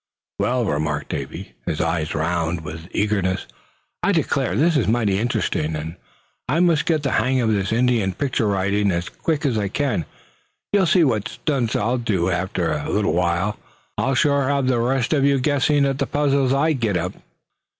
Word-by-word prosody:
"Well," 125 -1 +1
remarked 75 -4 -2
Davy, 70 -1 -6
his 75 - -1
eyes 80 -1 -1
round 85 +1 -1
with 80 +1 -8
eagerness; 100 -3 0 0.6
"I - - +2
declare, 90 - 0
this 160 +7 +3
is 140 - +2
mighty 105 -4 +1
interesting; 80 -8 -1
and 80 +2 -5 0.5
I 150 +5 +2
must 170 -4 +3
get 155 -3 +1
the 140 - 0
hang 130 0 +2
of 110 -3 +2
this 100 -1 -1
Indian 115 -5 +1
picture 130 -6 0
writing 100 +1 +1
as 85 0 -2
quick 155 -2 -2
as 120 -6 +1
I 100 - -1
can. 125 - -1 0.7
You'll 195 -3 +4
see 175 +1 +4
what 110 -8 +1
stunts 130 -7 -2
I'll 120 +4 0
do 95 -6 0
after 90 -2 -1
a 75 -1 -3
little 105 -1 +1
while. 90 +4 0 0.4
I'll 135 0 0
sure 140 0 +2
have 140 -2 +1
the 130 -2 +2
rest 125 +3 +1
of 140 -3 +2
you 140 -1 +3
guessing 145 +1 +2
at 135 0 -1
the - - 0
puzzles 140 -3 +1
I 150 +4 +2
get 115 -9 0
up." 90 +2 -3
115 Hz, 180 wpm, -22 LUFS, 90-140 Hz, 0.7 s, You'll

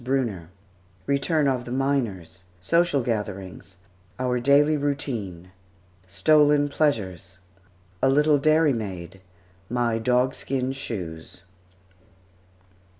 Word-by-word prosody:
BRUNNER 120 -10 -2 0.6
RETURN 145 +2 +1
OF 125 -2 -1
THE 120 - -7
MINERS 115 -10 -2
SOCIAL 165 - +1
GATHERINGS 100 -5 -5 0.4
OUR 125 -1 0
DAILY 145 +4 +4
ROUTINE 120 - -3 0.6
STOLEN 145 +9 +3
PLEASURES 100 - -1 0.6
A 135 - +4
LITTLE 150 +1 +3
DAIRYMAID 115 - 0 0.5
MY 120 -1 0
DOGSKIN 125 +2 0
SHOES. 90 -10 -7
125 Hz, 85 wpm, -24 LUFS, 95-140 Hz, 0.6 s, DAILY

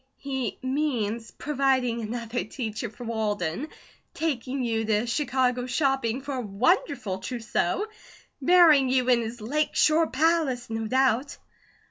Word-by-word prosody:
"He 265 -5 -3
means 245 -5 -1
providing 265 -5 0
another 230 +2 -3
teacher 220 0 -5
for 220 +3 -11
Walden, 215 - -2 0.5
taking 270 -4 -2
you 225 -2 0
to 215 +1 +1
Chicago 250 -1 0
shopping 265 -3 0
for 280 +1 -5
a 255 - -2
wonderful 240 - 0
trousseau, 235 - -1 0.6
marrying 310 -4 +6
you 255 -1 +2
in 240 -2 +4
his 230 +1 -6
Lake 295 +8 -1
Shore 320 +1 +4
palace, 275 -5 +1
no 225 0 -2
doubt." 260 +2 +1
250 Hz, 125 wpm, -26 LUFS, 225-275 Hz, 0.6 s, marrying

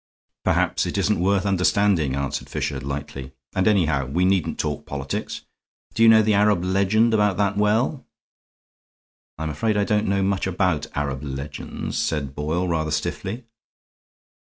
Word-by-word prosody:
"Perhaps - - +1
it - - -3
isn't 105 -3 +1
worth 95 +2 +1
understanding," 95 -6 +2
answered 70 0 -3
Fisher, 65 - -3
lightly, 70 -1 -6 0.2
"and, 95 +1 +1
anyhow, 80 -10 +2
we 85 +7 +1
needn't 95 -2 +1
talk 75 -2 -3
politics. 70 -1 -4 0.5
Do - - -2
you 115 - +8
know 110 -1 +7
the 105 0 +2
Arab 100 -3 +3
legend 100 +5 +2
about 105 -4 +2
that 100 -1 +1
well?" 110 +7 +1 1.3
"I'm 80 0 -3
afraid 105 +9 0
I 100 - +2
don't 105 +1 +1
know 100 0 +1
much 95 0 0
about 90 -5 0
Arab 70 -2 -2
legends," 70 +1 -5
said 70 -4 -2
Boyle, 80 +5 -2
rather 80 -2 -1
stiffly. 100 +9 -3
90 Hz, 150 wpm, -23 LUFS, 75-105 Hz, 1.3 s, you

